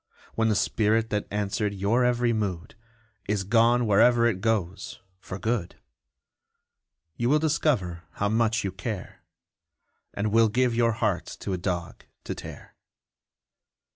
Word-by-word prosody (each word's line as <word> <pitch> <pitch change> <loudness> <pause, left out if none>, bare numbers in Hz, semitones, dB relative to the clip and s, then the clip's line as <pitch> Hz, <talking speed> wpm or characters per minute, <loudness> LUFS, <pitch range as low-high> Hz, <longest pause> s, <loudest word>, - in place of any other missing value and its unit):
When 110 0 +1
the 105 - +2
spirit 110 +2 +1
that 105 -1 -1
answered 105 0 -2
your 105 +6 +1
every 120 -1 +2
mood 95 -6 -3 0.5
Is 105 -1 0
gone 115 +4 +3
wherever 115 +3 +4
it 105 -6 0
goes 105 -5 -2 0.2
for 95 0 -7
good, 110 -4 -2 1.4
You 120 +1 0
will 150 - +5
discover 135 - 0
how 100 - -1
much 115 +1 +1
you 95 - -2
care, 95 +1 -6 0.9
And 105 +1 -1
will 115 0 +4
give 125 +2 +1
your 115 -1 +2
heart - - -1
to 95 - -3
a - - -1
dog 85 -2 -4 0.2
to - - -4
tear! - - -10
110 Hz, 140 wpm, -26 LUFS, 100-120 Hz, 1.4 s, will